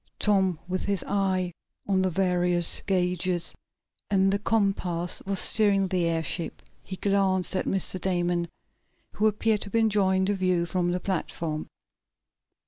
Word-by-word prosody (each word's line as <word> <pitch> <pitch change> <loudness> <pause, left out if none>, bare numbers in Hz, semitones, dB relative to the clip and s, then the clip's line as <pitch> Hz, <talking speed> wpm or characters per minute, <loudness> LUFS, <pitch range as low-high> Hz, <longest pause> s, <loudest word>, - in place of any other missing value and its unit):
Tom, 190 -4 +2
with 185 0 -2
his 200 -2 -1
eye 190 -3 0 0.3
on 190 -2 +2
the 185 - +1
various 180 -1 +1
gauges 180 -2 0 0.6
and 195 -1 +3
the 200 - +1
compass, 195 -5 +1
was 195 0 -1
steering 200 -1 +3
the 180 -2 +1
airship. 165 +1 -2 0.2
He 190 - -7
glanced 190 -1 +1
at - - 0
Mr. 190 -1 -2
Damon, 175 -2 0 0.6
who 215 - +1
appeared 215 0 +1
to 200 - -5
be 230 - -1
enjoying 200 -4 +2
the 205 - +1
view 185 -3 +1
from 175 +1 -1
the 180 +1 -1
platform. 165 -4 -3
185 Hz, 140 wpm, -26 LUFS, 175-195 Hz, 0.6 s, and